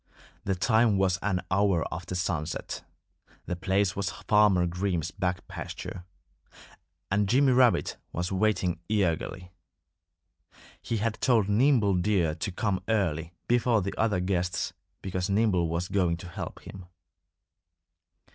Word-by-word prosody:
The 95 Hz, -, 0 dB
time 110 Hz, +2 st, +3 dB
was 95 Hz, -2 st, +2 dB
an 95 Hz, -3 st, 0 dB
hour 95 Hz, -3 st, +2 dB
after 90 Hz, +3 st, -5 dB
sunset. 85 Hz, -3 st, -3 dB, 0.6 s
The 90 Hz, -, -3 dB
place 95 Hz, +2 st, +1 dB
was 100 Hz, -3 st, -1 dB
Farmer 105 Hz, -2 st, +3 dB
Green's 90 Hz, -1 st, -1 dB
back 90 Hz, -1 st, -3 dB
pasture. 90 Hz, -1 st, -7 dB, 1.1 s
And 100 Hz, 0 st, +2 dB
Jimmy 135 Hz, +3 st, +4 dB
Rabbit 125 Hz, -7 st, +3 dB
was 90 Hz, +2 st, -3 dB
waiting 95 Hz, -3 st, +1 dB
eagerly. 90 Hz, -2 st, -1 dB, 1.3 s
He 115 Hz, -, -2 dB
had 110 Hz, +1 st, -2 dB
told 115 Hz, -6 st, +3 dB
Nimble 110 Hz, -2 st, +4 dB
Deer 90 Hz, -4 st, +1 dB
to 80 Hz, +5 st, -4 dB
come 95 Hz, 0 st, -1 dB
early, 85 Hz, -7 st, 0 dB
before 120 Hz, -3 st, +2 dB
the 100 Hz, -, -3 dB
other 105 Hz, -4 st, +1 dB
guests, 90 Hz, -1 st, -1 dB, 0.3 s
because 95 Hz, 0 st, -2 dB
Nimble 100 Hz, -5 st, +2 dB
was 85 Hz, +2 st, -2 dB
going 90 Hz, -4 st, +1 dB
to 90 Hz, +1 st, -9 dB
help -, -, -7 dB
him. 95 Hz, -2 st, -10 dB
95 Hz, 130 wpm, -28 LUFS, 90-105 Hz, 1.3 s, Jimmy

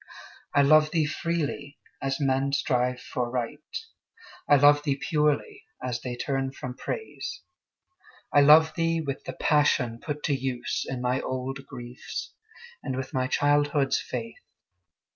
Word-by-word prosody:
I 145 Hz, -, +6 dB
love 155 Hz, +2 st, +6 dB
thee 160 Hz, -2 st, +1 dB
freely, 155 Hz, -2 st, -3 dB, 0.2 s
as 135 Hz, 0 st, -1 dB
men 135 Hz, 0 st, +1 dB
strive 125 Hz, -2 st, +1 dB
for 125 Hz, -1 st, -3 dB
Right; 125 Hz, +4 st, -3 dB, 0.9 s
I 145 Hz, -, +8 dB
love 145 Hz, +1 st, +6 dB
thee 140 Hz, -2 st, -1 dB
purely, 155 Hz, -, 0 dB
as 125 Hz, -1 st, -3 dB
they 125 Hz, -1 st, -4 dB
turn 135 Hz, +1 st, -2 dB
from 125 Hz, -2 st, -6 dB
Praise. -, -, -5 dB, 0.9 s
I 145 Hz, -, +7 dB
love 155 Hz, +2 st, +7 dB
thee 165 Hz, 0 st, +1 dB
with 140 Hz, -4 st, -4 dB
the -, -, -5 dB
passion 135 Hz, -6 st, +2 dB
put 150 Hz, +2 st, -5 dB
to 145 Hz, -, +1 dB
use 130 Hz, -2 st, -2 dB
In 130 Hz, -2 st, -3 dB
my 125 Hz, +1 st, +1 dB
old 135 Hz, +1 st, -4 dB
griefs, 120 Hz, +1 st, -7 dB, 0.5 s
and 130 Hz, -, -3 dB
with 130 Hz, 0 st, -5 dB
my 130 Hz, -1 st, +1 dB
childhood's 145 Hz, -1 st, +2 dB
faith. 115 Hz, -2 st, -6 dB
140 Hz, 145 wpm, -27 LUFS, 130-150 Hz, 0.9 s, I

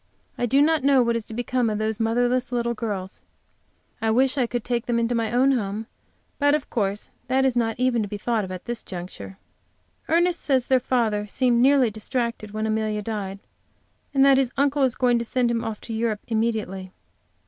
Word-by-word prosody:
I 245 Hz, -, -1 dB
do 275 Hz, +4 st, +4 dB
not 315 Hz, -2 st, +2 dB
know 275 Hz, -2 st, +5 dB
what 235 Hz, 0 st, +1 dB
is 230 Hz, -2 st, -3 dB
to -, -, -9 dB
become 245 Hz, 0 st, 0 dB
of 210 Hz, -, -1 dB
those 215 Hz, 0 st, -2 dB
motherless 245 Hz, +3 st, +1 dB
little 235 Hz, -1 st, 0 dB
girls. 205 Hz, -5 st, -5 dB, 0.8 s
I 225 Hz, -, +1 dB
wish 260 Hz, +4 st, +3 dB
I 255 Hz, -4 st, +1 dB
could 240 Hz, -1 st, -3 dB
take 240 Hz, -1 st, -2 dB
them 240 Hz, -1 st, +1 dB
into 235 Hz, +1 st, +1 dB
my 230 Hz, -2 st, -1 dB
own 255 Hz, +3 st, +4 dB
home, 215 Hz, -3 st, -2 dB, 0.5 s
but, 285 Hz, 0 st, +4 dB
of 300 Hz, -, -5 dB
course, 205 Hz, -2 st, -2 dB, 0.2 s
that 265 Hz, +1 st, +2 dB
is 260 Hz, -2 st, +2 dB
not 225 Hz, -2 st, +1 dB
even 250 Hz, -2 st, +2 dB
to 210 Hz, -, -2 dB
be 205 Hz, +1 st, -5 dB
thought 215 Hz, -2 st, -1 dB
at 185 Hz, -1 st, -7 dB
this 240 Hz, -1 st, -3 dB
juncture. 185 Hz, +1 st, -8 dB, 0.7 s
Ernest 345 Hz, +1 st, +2 dB
says 265 Hz, -4 st, +1 dB
their 260 Hz, -1 st, +3 dB
father 220 Hz, -5 st, 0 dB
seemed 240 Hz, +2 st, +2 dB
nearly 265 Hz, -3 st, +4 dB
distracted 230 Hz, 0 st, -3 dB
when 215 Hz, +1 st, -3 dB
Amelia 215 Hz, -1 st, -1 dB
died, 200 Hz, -3 st, -4 dB, 0.7 s
and 275 Hz, -1 st, +4 dB
that 270 Hz, -1 st, +6 dB
his 260 Hz, -2 st, +1 dB
uncle 280 Hz, +1 st, +2 dB
is 260 Hz, -3 st, +2 dB
going 245 Hz, -2 st, +2 dB
to -, -, -2 dB
send 240 Hz, +1 st, 0 dB
him 230 Hz, -1 st, -1 dB
off 220 Hz, -2 st, -4 dB
to 230 Hz, -, -7 dB
Europe 220 Hz, -2 st, -1 dB
immediately. 220 Hz, -5 st, -2 dB
235 Hz, 205 wpm, -24 LUFS, 215-255 Hz, 0.8 s, that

